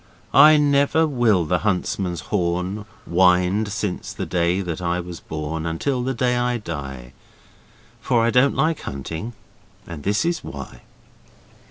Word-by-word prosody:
I 155 0 +8
never 145 +2 +3
will 120 - +2
the 90 +2 +1
huntsman's 90 -3 -1
horn 90 +2 -1 0.2
Wind 90 +3 +3
since 105 -3 -3
the - - -4
day 90 +1 0
that 90 -2 -4
I 85 0 -1
was 90 -1 -7
born 80 +1 -4
Until 125 - -1
the 130 +1 -2
day 125 +1 +1
I 120 0 0
die 70 - -7 0.9
For 115 -2 +1
I 115 - +2
don't 125 +3 +3
like 160 0 +1
hunting, 80 - -6 0.5
and 85 -3 -8
this 105 - 0
is 170 0 -1
why. 70 -3 -9
95 Hz, 145 wpm, -22 LUFS, 85-125 Hz, 0.9 s, I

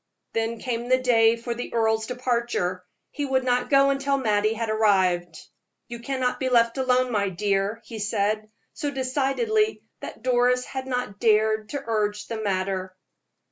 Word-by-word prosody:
Then 225 +1 -1
came 240 0 -4
the 255 - +5
day 230 -3 +4
for 235 +1 -4
the 240 +1 -6
earl's 220 -1 +1
departure 235 -8 -1 0.3
he 290 - -4
would 265 -2 +1
not 250 0 0
go 275 0 +5
until 275 0 0
Mattie 215 -3 +1
had 230 0 -2
arrived. 185 -6 +2 0.5
"You 235 0 -6
cannot 255 0 -2
be 260 - 0
left 235 +1 +3
alone, 255 -1 +2
my 200 -3 +1
dear," 200 +3 -1
he 225 - -8
said, 210 0 -1 0.2
so 295 -3 -3
decidedly 285 - 0 0.2
that - - -9
Doris 250 0 +2
had 265 -1 -6
not 250 -6 -3
dared 215 -1 +2
to 285 -1 -4
urge 210 -2 -1
the 225 -1 -5
matter. 190 -2 -2
230 Hz, 160 wpm, -25 LUFS, 210-255 Hz, 0.5 s, the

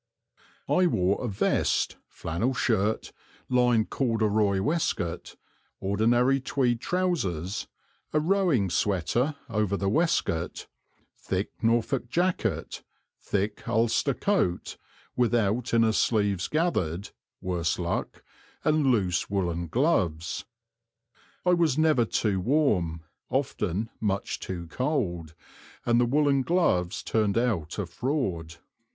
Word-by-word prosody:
I 180 0 +3
wore 95 - +1
a - - -1
vest, 100 -3 +1
flannel 105 +11 -2
shirt, 110 -3 0 0.4
lined 125 -3 +3
corduroy 110 -5 +1
waistcoat, 105 - -1 0.4
ordinary 120 +7 +2
tweed 125 -3 0
trousers, 105 - -1 0.4
a 155 - +2
rowing 160 - +2
"sweater" 105 - 0
over 105 -4 0
the 95 0 0
waistcoat, 110 - 0 0.5
thick 95 +1 -2
Norfolk 120 +2 +1
jacket, 120 - -1 0.4
thick 105 +1 -2
Ulster 115 +4 +2
coat 185 - 0 0.4
without 115 -1 +1
inner 115 -1 +4
sleeves 105 -5 +1
gathered, 100 - -1 0.3
worse 85 -3 -1
luck 85 -1 -3 0.4
and 155 -2 +2
loose 95 -9 +1
woollen 85 -4 -1
gloves. 90 - 0 1.0
I 180 - +5
was 165 -5 +2
never 155 -7 +4
too 105 -3 0
warm, 90 - +1 0.3
often 110 -6 -1
much 100 -2 -1
too 90 -2 -5
cold, 90 - -2 0.5
and 120 0 +3
the 120 - +2
woollen 140 +1 +3
gloves 125 - +1
turned 105 -2 +1
out 110 -10 0
a 105 - -1
fraud. 85 - -2
110 Hz, 105 wpm, -27 LUFS, 95-135 Hz, 1.0 s, I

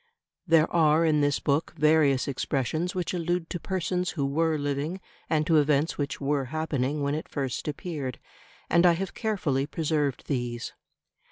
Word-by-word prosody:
There 160 -1 +5
are 160 0 +4
in 155 -2 +3
this 145 -1 +2
book 145 +3 0
various 150 -4 +3
expressions 145 +6 -1
which 180 -1 -2
allude 175 0 -1
to 175 - -3
persons 180 0 -1
who 140 - +1
were 160 +3 +1
living 145 +5 -2 0.3
and 155 -1 +2
to 160 0 +4
events 150 +1 +2
which 140 -1 -2
were 140 -1 0
happening 145 -1 -2
when 140 0 0
it 155 - -4
first 135 -2 -3
appeared; 145 -4 -4 0.5
and 170 +1 +5
I 170 - +6
have 190 +3 -3
carefully 155 - -1
preserved 150 -4 -1
these. 120 -4 -3
150 Hz, 160 wpm, -27 LUFS, 140-165 Hz, 0.5 s, I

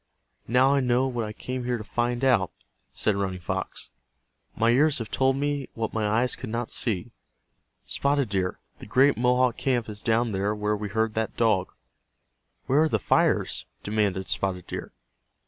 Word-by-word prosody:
"Now 130 +4 +4
I 140 - +3
know 125 0 +2
what 120 -3 -2
I 105 - -5
came 125 +4 -5
here 120 0 -1
to 110 - -7
find 120 +3 -1
out," 105 -9 +3 0.4
said 110 - +1
Running 95 -2 -2
Fox. 85 - -4 0.6
"My 115 +1 +3
ears 145 +4 +4
have 115 -3 -5
told 130 0 +2
me 145 -1 -2
what 115 -1 -3
my 110 -1 0
eyes 115 +4 +2
could - - -7
not 115 +1 -3
see. 110 0 -1 0.7
Spotted 140 -3 +1
Deer, 95 -2 -1 0.2
the - - -10
great 135 +6 +4
Mohawk 125 0 +2
camp 125 -4 0
is 105 -1 -6
down 115 0 +1
there 100 +2 0
where 105 0 0
we 105 0 -4
heard 110 +1 0
that 110 0 -2
dog." 105 -6 +2 0.9
"Where 140 +4 +3
are 160 - +3
the - - +2
fires?" - - +1 0.2
demanded 100 -3 0
Spotted 90 -2 -2
Deer. - - -6
115 Hz, 175 wpm, -26 LUFS, 105-130 Hz, 0.9 s, Now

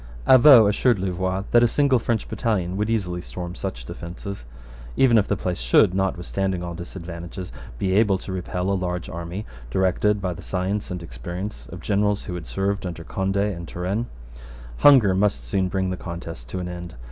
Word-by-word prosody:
Avaux 130 -4 +9
assured 115 +3 +3
Louvois 95 0 -1
that 120 - +6
a 120 - +6
single 135 +1 +3
French 115 -1 -1
battalion 95 -7 -1
would 105 +2 -1
easily 90 -6 -1
storm 90 0 -6
such 75 -11 -5
defences. 85 +2 -7 0.5
Even 125 -3 +5
if 105 -3 +4
the 105 - 0
place 90 -1 -3
should, - - +4
notwithstanding 95 -1 -1
all 85 0 -4
disadvantages, 85 +1 -7 0.3
be 95 +7 0
able 100 -1 +4
to 95 - -8
repel 90 0 -2
a - - +2
large 90 -2 -2
army 85 +5 -5 0.2
directed 95 - +2
by 90 -2 -2
the - - -10
science 95 +3 -2
and 90 -1 -5
experience 85 - -6
of 90 0 -8
generals 105 +1 +1
who 90 - -5
had 85 -3 -6
served 100 0 -1
under 85 -1 -6
Conde 95 +4 -2
and 100 -4 -1
Turenne, 95 +8 -2 0.7
hunger 130 -10 +7
must 100 +2 +1
soon 95 -2 0
bring 95 0 -1
the 90 - -3
contest 85 -9 -7
to - - -4
an 90 -1 -3
end. 90 -1 -7
95 Hz, 180 wpm, -23 LUFS, 90-100 Hz, 0.7 s, Avaux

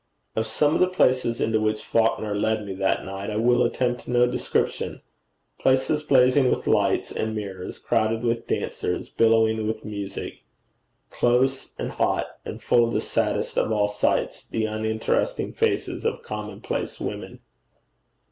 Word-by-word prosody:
Of 110 0 0
some 145 +7 +2
of - - +1
the 185 - +5
places 130 -9 +2
into 110 -1 +1
which 110 0 0
Falconer 110 -2 +1
led 110 +1 0
me 100 - -5
that 95 0 0
night 95 +1 -5
I 105 - -3
will 120 +3 +3
attempt 120 0 -1
no 120 0 +4
description 125 - -1 0.6
places 130 +3 +2
blazing 130 -2 +4
with - - -1
lights - - +2
and 110 0 -2
mirrors, 95 -3 -6
crowded 115 0 0
with 115 -1 -1
dancers, - - -2
billowing 110 -1 +3
with 110 0 -3
music, 100 -2 -5 0.7
close 130 +2 +1
and - - -3
hot, - - +1 0.2
and - - -7
full 120 -1 +4
of 115 - -3
the - - +2
saddest - - 0
of - - 0
all 105 -1 +2
sights, 105 0 0
the 110 -1 -1
uninteresting 110 - -1
faces 455 -1 -1
of 460 +1 -2
commonplace 470 - -5
women. - - -5
115 Hz, 150 wpm, -25 LUFS, 110-125 Hz, 0.7 s, the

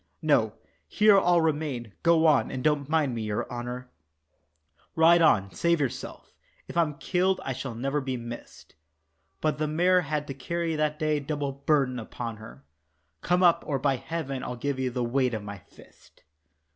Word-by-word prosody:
"No, - - +3 0.3
here 210 -1 +5
I'll 175 -2 +3
remain. 145 -8 -2
Go 165 -1 +4
on, 140 -8 +4
and 130 -1 -5
don't 150 -2 +1
mind 155 -5 +1
me, 115 - -3
your 105 -1 -2
honour, 125 +1 -6 1.0
Ride 170 +1 +6
on, 100 -11 +3
save 170 - +1
yourself, 135 -4 -5 0.3
if - - -9
I'm 160 -4 +1
killed 185 +1 +1
I 135 - -2
shall 125 -1 -6
never 135 +5 -1
be 130 -1 -3
missed." 120 0 -10 0.7
But 155 -1 0
the 155 - 0
mare 180 +4 +3
had 150 -2 -2
to 135 - -6
carry 165 +4 -3
that 150 0 0
day 155 -1 0
double 145 -1 -3
burden 135 -2 0
upon 115 0 -6
her 70 -11 -13 0.6
"Come 180 +2 +2
up, 175 -2 +4
or 140 - 0
by 135 0 +1
heaven, 140 -4 -4
I'll 125 - -4
give 135 +2 -3
you 130 -1 0
the 125 0 -2
weight 125 0 +1
of 105 - -5
my 100 -1 -7
fist." - - -21
140 Hz, 175 wpm, -27 LUFS, 125-160 Hz, 1.0 s, Ride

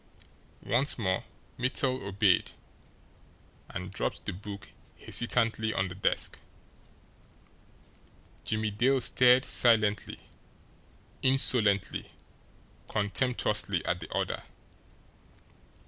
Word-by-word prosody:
Once 135 +5 +2
more 95 -5 -1 0.4
Mittel 130 +1 0
obeyed 100 -1 +2 1.2
and - - -7
dropped - - -3
the - - -3
book 100 +2 -9 0.3
hesitantly 115 -2 +1
on 95 0 0
the - - -7
desk. 95 - -1 2.0
Jimmie 110 0 -1
Dale 130 +6 +2
stared 125 +1 +5
silently, 105 -5 +2 1.0
insolently, 120 -7 +2 0.8
contemptuously 105 -3 0
at 90 - -1
the 80 - -10
other. - - -2
110 Hz, 80 wpm, -29 LUFS, 100-125 Hz, 2.0 s, stared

